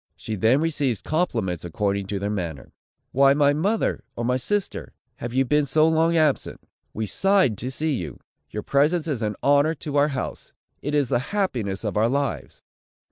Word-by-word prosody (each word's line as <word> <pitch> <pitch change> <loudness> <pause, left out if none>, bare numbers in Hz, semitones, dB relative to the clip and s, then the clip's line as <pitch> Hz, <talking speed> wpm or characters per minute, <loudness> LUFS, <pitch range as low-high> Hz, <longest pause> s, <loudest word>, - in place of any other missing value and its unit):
She 110 - -6
then 110 +8 +3
receives 145 -8 0
compliments 115 - -1
according 100 +3 -1
to 100 - -2
their 100 +1 -2
manner: 85 -8 -5 0.4
"Why, 135 +1 +5
my 145 -1 +4
mother, 200 +9 0
or 120 - -3
my 125 +1 +2
sister, 200 +10 -2 0.2
have 120 - -5
you 130 +2 +2
been 150 +3 +2
so 155 +3 +4
long 165 +1 +3
absent? 155 -3 +1 0.3
We 110 - -3
sighed 190 - +2
to 125 - -3
see 155 +3 -1
you! 80 - -5 0.3
Your 105 +5 -5
presence 150 +4 +2
is 140 -7 -2
an 105 -1 -1
honor 145 +3 +4
to 145 -1 -4
our 145 +1 +5
house! 135 -3 -5 0.3
It 145 +1 -2
is 140 -4 +2
the - - +2 0.2
happiness 115 - -1
of 105 -1 -2
our 110 +2 +3
lives!" 140 +1 -3
135 Hz, 185 wpm, -24 LUFS, 105-155 Hz, 0.4 s, Why